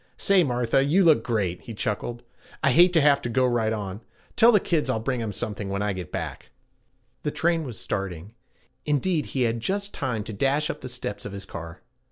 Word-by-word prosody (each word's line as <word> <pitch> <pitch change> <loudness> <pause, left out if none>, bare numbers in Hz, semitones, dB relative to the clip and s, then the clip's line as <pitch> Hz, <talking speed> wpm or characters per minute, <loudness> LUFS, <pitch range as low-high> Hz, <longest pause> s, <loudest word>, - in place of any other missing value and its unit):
'Say, 195 -2 +4
Martha, 125 -1 +1
you 165 +8 +3
look 160 -3 +5
great,' 100 -7 -1
he 115 - -8
chuckled. 120 +4 -3 0.4
'I 140 - +4
hate 175 +6 +6
to 165 - +5
have 140 -1 +4
to 120 - -3
go 130 +3 +2
right 120 -3 +1
on. 100 -3 -4
You - - -16 0.3
tell 235 +2 +7
the 210 - +5
kids 160 -6 0
I'll 115 - +1
bring 125 +1 -2
'em 110 -2 -3
something 105 -1 -4
when 100 +1 -1
I 105 -1 0
get 90 -4 -7
back.' - - -5 0.7
The - - -1
train 165 +2 +1
was 125 -7 -7
starting; 95 0 -4 0.5
indeed 150 +2 0
he 130 - -1
had 115 0 0
just 200 - -2
time 125 -6 -2
to 110 - -7
dash 140 +9 +1
up - - -10
the 130 - -6
steps 125 -5 -5
of 105 - -7
his 100 0 -6
car. 85 -2 -8
120 Hz, 220 wpm, -25 LUFS, 105-150 Hz, 0.7 s, tell